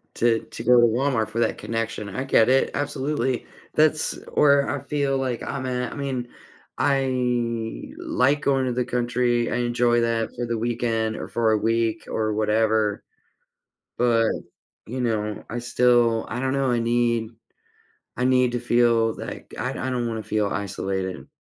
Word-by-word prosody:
to 115 Hz, -1 st, +3 dB
to -, -, -8 dB
go 125 Hz, 0 st, +6 dB
to 120 Hz, -, +6 dB
Walmart 115 Hz, -2 st, 0 dB
for 115 Hz, +2 st, -3 dB
that -, -, +1 dB
connection. 115 Hz, -2 st, -3 dB
I 130 Hz, -, -1 dB
get 115 Hz, -4 st, +4 dB
it, 130 Hz, +1 st, +3 dB
absolutely. 145 Hz, -2 st, -1 dB, 0.3 s
That's 155 Hz, 0 st, +3 dB, 0.2 s
where 140 Hz, -1 st, +4 dB
I 145 Hz, -, -1 dB
feel, 140 Hz, -2 st, 0 dB
like 130 Hz, -3 st, -2 dB
I'm 135 Hz, -2 st, -4 dB
at, 125 Hz, -1 st, -2 dB
I -, -, -8 dB
mean, 135 Hz, -3 st, -3 dB, 0.5 s
I 125 Hz, -, -1 dB
like 320 Hz, -, +1 dB
going 135 Hz, -3 st, +2 dB
to 125 Hz, -, -1 dB
the 125 Hz, 0 st, 0 dB
country. 120 Hz, -1 st, 0 dB
I -, -, 0 dB
enjoy 120 Hz, 0 st, +2 dB
that 115 Hz, -1 st, -1 dB
for 120 Hz, -, -3 dB
the 115 Hz, -1 st, -2 dB
weekend 115 Hz, -1 st, -1 dB
or -, -, -5 dB
for 115 Hz, -2 st, +1 dB
a 110 Hz, -, +3 dB
week 115 Hz, 0 st, 0 dB
or 110 Hz, -1 st, -1 dB
whatever. 110 Hz, 0 st, +1 dB, 0.9 s
But, 115 Hz, -2 st, +3 dB, 0.6 s
you 130 Hz, +3 st, -4 dB
know, 105 Hz, -3 st, -2 dB
I 120 Hz, -, -4 dB
still, 120 Hz, -1 st, +3 dB
I 120 Hz, +3 st, -4 dB
don't 130 Hz, 0 st, 0 dB
know, 135 Hz, -1 st, +1 dB
I 120 Hz, -, +1 dB
need 115 Hz, -1 st, +1 dB, 0.9 s
I 125 Hz, -, -1 dB
need 125 Hz, -1 st, +3 dB
to 120 Hz, -, -1 dB
feel 120 Hz, -1 st, +3 dB
like -, -, -8 dB
I 125 Hz, +4 st, -1 dB
I 130 Hz, 0 st, -3 dB
don't 120 Hz, -2 st, -1 dB
wanna 110 Hz, -1 st, -4 dB
feel 105 Hz, -1 st, 0 dB
isolated. 95 Hz, -2 st, -3 dB
120 Hz, 170 wpm, -24 LUFS, 115-130 Hz, 0.9 s, go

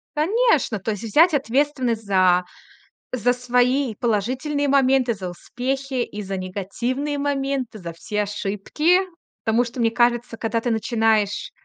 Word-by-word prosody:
Конечно, 320 Hz, -, +2 dB
то 220 Hz, -, -2 dB
есть 205 Hz, 0 st, -5 dB
взять 315 Hz, -, +4 dB
ответственность 260 Hz, -4 st, 0 dB
за 185 Hz, -2 st, +3 dB, 0.7 s
за 245 Hz, 0 st, +2 dB
свои 250 Hz, +1 st, +1 dB
положительные 255 Hz, +7 st, -1 dB
моменты, 265 Hz, -2 st, +3 dB
за 190 Hz, -4 st, -6 dB
успехи 265 Hz, +8 st, -4 dB
и 210 Hz, -3 st, -4 dB
за 195 Hz, 0 st, -4 dB
негативные 235 Hz, +10 st, -3 dB
моменты, 275 Hz, -4 st, -2 dB
за 170 Hz, -4 st, -7 dB
все 210 Hz, +5 st, -3 dB
ошибки. 210 Hz, -, +1 dB, 0.4 s
Потому 230 Hz, +2 st, +2 dB
что, 240 Hz, +1 st, -5 dB
мне 225 Hz, -1 st, +3 dB
кажется, 240 Hz, 0 st, +1 dB
когда 225 Hz, 0 st, -1 dB
ты 240 Hz, -, -1 dB
начинаешь 220 Hz, -2 st, +1 dB
240 Hz, 135 wpm, -22 LUFS, 210-270 Hz, 0.7 s, взять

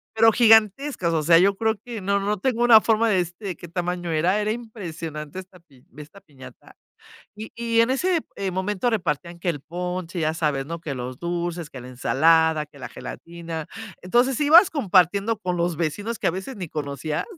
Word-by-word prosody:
pero 225 Hz, 0 st, +6 dB
gigantescas, 220 Hz, -, +3 dB
o 160 Hz, -, +1 dB
sea, 165 Hz, +2 st, +5 dB
yo 195 Hz, +3 st, +4 dB
creo 220 Hz, +1 st, 0 dB
que 235 Hz, -3 st, -6 dB
no 200 Hz, +1 st, +1 dB
no 205 Hz, +1 st, -1 dB
tengo 240 Hz, +2 st, 0 dB
una 230 Hz, -3 st, +8 dB
forma 225 Hz, 0 st, +2 dB
de 205 Hz, -4 st, +2 dB
decirte 175 Hz, +3 st, -4 dB
de 185 Hz, -3 st, -3 dB
qué 175 Hz, -, -11 dB
tamaño 175 Hz, 0 st, -3 dB
era, 175 Hz, +6 st, +1 dB
era 210 Hz, -, -1 dB
impresionante 170 Hz, -9 st, -7 dB
esta 185 Hz, -1 st, -10 dB
pi 135 Hz, -7 st, -24 dB
esta 155 Hz, +7 st, -12 dB
piñata, 140 Hz, -7 st, -15 dB, 0.6 s
y 215 Hz, +1 st, -9 dB
y 230 Hz, -1 st, +1 dB
en 230 Hz, -, +3 dB
ese, 345 Hz, +6 st, +1 dB, 0.2 s
eh, 195 Hz, -1 st, -2 dB
momento 190 Hz, +5 st, -1 dB
repartían 170 Hz, -4 st, -2 dB
que 175 Hz, -, -4 dB
el 155 Hz, -4 st, -1 dB
ponche, 180 Hz, 0 st, -5 dB
ya 155 Hz, 0 st, 0 dB
sabes, 150 Hz, -4 st, -1 dB
¿no?, 170 Hz, +2 st, -5 dB
que 150 Hz, -4 st, -5 dB
los 125 Hz, 0 st, -6 dB
dulces, 170 Hz, -1 st, -4 dB
que 130 Hz, -, -9 dB
la 125 Hz, -, -10 dB
ensalada, 160 Hz, +5 st, +2 dB
que 145 Hz, -1 st, -18 dB
la 130 Hz, -, -7 dB
gelatina, 165 Hz, +4 st, -8 dB, 0.4 s
entonces, 240 Hz, +7 st, +2 dB
ibas 330 Hz, +6 st, +7 dB
compartiendo 200 Hz, -, +2 dB
con 180 Hz, -4 st, -3 dB
los 170 Hz, -1 st, -1 dB
vecinos 205 Hz, +8 st, -3 dB
que -, -, -2 dB
a -, -, +4 dB
veces 190 Hz, +8 st, -6 dB
ni 180 Hz, -5 st, -6 dB
conocías, 150 Hz, 0 st, -4 dB
180 Hz, 195 wpm, -23 LUFS, 160-215 Hz, 0.6 s, una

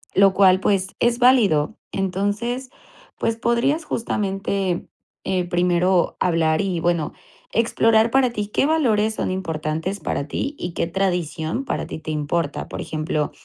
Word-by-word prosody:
lo 195 Hz, 0 st, +6 dB
cual, 185 Hz, -1 st, +5 dB
pues, 195 Hz, -1 st, +1 dB
es 240 Hz, 0 st, +2 dB
válido. 220 Hz, -, +4 dB, 0.2 s
Entonces, 205 Hz, +7 st, -2 dB, 0.5 s
pues, 225 Hz, -, 0 dB
podrías, 250 Hz, +7 st, +1 dB
justamente, 195 Hz, -5 st, -2 dB, 0.4 s
eh, 185 Hz, -1 st, 0 dB
primero 175 Hz, +1 st, +2 dB
hablar 160 Hz, -3 st, +2 dB
y 190 Hz, -4 st, -1 dB
bueno, 170 Hz, -2 st, 0 dB, 0.4 s
explorar 225 Hz, 0 st, +3 dB
para 265 Hz, -1 st, +3 dB
ti 210 Hz, -3 st, -3 dB
qué 210 Hz, -, +1 dB
valores 225 Hz, -9 st, +2 dB
son -, -, -2 dB
importantes 165 Hz, 0 st, -3 dB
para 145 Hz, -3 st, -3 dB
ti 280 Hz, -, -3 dB
y 175 Hz, -, -5 dB
qué -, -, -1 dB
tradición 175 Hz, -, -1 dB
para -, -, -2 dB
ti -, -, -7 dB
te 155 Hz, -, -8 dB
importa. 150 Hz, 0 st, -2 dB
Por -, -, -5 dB
ejemplo, 155 Hz, -1 st, -2 dB
190 Hz, 145 wpm, -22 LUFS, 170-225 Hz, 0.5 s, lo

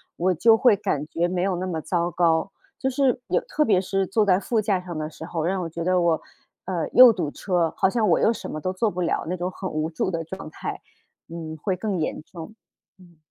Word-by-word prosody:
我 185 Hz, +2 st, +1 dB
就 225 Hz, +7 st, +5 dB
会 230 Hz, -1 st, +5 dB
感 170 Hz, -8 st, -2 dB
觉 170 Hz, +2 st, 0 dB
没 180 Hz, 0 st, -2 dB
有 190 Hz, -1 st, 0 dB
那 185 Hz, +2 st, -3 dB
么 165 Hz, -4 st, -3 dB
糟 175 Hz, +1 st, -1 dB
糕。 165 Hz, +2 st, +1 dB, 0.3 s
就 265 Hz, -, -1 dB
是， 265 Hz, -1 st, +1 dB
有 -, -, +2 dB
特 305 Hz, -11 st, 0 dB
别 190 Hz, -4 st, +3 dB
是 195 Hz, 0 st, -1 dB
坐 215 Hz, +3 st, +1 dB
在 190 Hz, -2 st, +3 dB
副 220 Hz, +2 st, 0 dB
驾 200 Hz, -3 st, +1 dB
上 180 Hz, -2 st, -8 dB
的 155 Hz, 0 st, -3 dB
时 160 Hz, -, -10 dB
候， 165 Hz, -2 st, -3 dB
让 185 Hz, +2 st, 0 dB
我 -, -, -3 dB
觉 165 Hz, +1 st, -5 dB
得 185 Hz, 0 st, +2 dB
我 170 Hz, -2 st, +2 dB, 0.4 s
呃， 175 Hz, -4 st, -2 dB
又 250 Hz, -2 st, +10 dB
堵 170 Hz, -8 st, -3 dB
车， 175 Hz, -4 st, 0 dB
好 190 Hz, -, +2 dB
像 220 Hz, 0 st, +1 dB
我 -, -, +4 dB
又 225 Hz, -, +4 dB
什 -, -, -6 dB
么 155 Hz, -, -5 dB
都 185 Hz, -, -1 dB
做 210 Hz, +3 st, 0 dB
不 180 Hz, +1 st, -4 dB
了， 170 Hz, -, -1 dB
那 180 Hz, -, -1 dB
种 180 Hz, +1 st, -3 dB
很 185 Hz, 0 st, -6 dB
无 155 Hz, +1 st, -2 dB
助 180 Hz, +3 st, -2 dB
的 165 Hz, -1 st, -2 dB
状 165 Hz, -1 st, -8 dB
态， -, -, -6 dB, 0.5 s
嗯， 160 Hz, -1 st, -7 dB
会 185 Hz, +5 st, -1 dB
更 195 Hz, -2 st, -2 dB
严 155 Hz, -, -2 dB
重。 170 Hz, +5 st, -10 dB, 0.5 s
嗯。 175 Hz, -3 st, -19 dB
180 Hz, 260 characters per minute, -24 LUFS, 165-195 Hz, 0.5 s, 又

